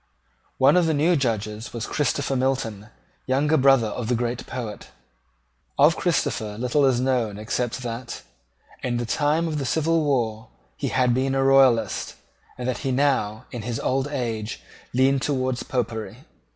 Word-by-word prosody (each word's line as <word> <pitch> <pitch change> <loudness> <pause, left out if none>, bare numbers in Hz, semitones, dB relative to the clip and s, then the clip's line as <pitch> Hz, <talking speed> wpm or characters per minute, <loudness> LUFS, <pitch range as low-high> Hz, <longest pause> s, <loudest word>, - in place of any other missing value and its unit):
One 135 +7 +5
of 175 -2 +3
the 160 - +1
new 165 +5 +3
Judges 110 -5 -2
was 115 -2 -3
Christopher 140 -1 -1
Milton, 125 -6 -1 0.4
younger 145 +4 +2
brother 135 -4 +5
of 115 +1 -4
the 125 - +1
great 120 +1 -3
poet. 115 -5 -6 0.9
Of 150 +3 +5
Christopher 110 - -1
little 125 +4 +2
is 130 -3 +3
known 125 -5 0
except 120 +3 -3
that, 120 +1 -6 0.6
in 120 -2 -1
the 120 - -2
time 150 +7 +1
of 155 -2 -2
the - - -2
civil 160 +3 +1
war, 115 -6 -1 0.3
he - - -3
had 125 -2 +2
been 135 +2 0
a 135 - +2
Royalist, 130 -6 +3 0.4
and 125 0 -4
that 130 - -1
he 135 - -2
now, 125 -6 0
in 120 - -5
his 115 +1 -4
old 135 +1 0
age, 115 -6 -3 0.3
leaned 135 +2 +3
towards 130 -3 -1
Popery. 115 -3 -4
130 Hz, 160 wpm, -24 LUFS, 115-135 Hz, 0.9 s, One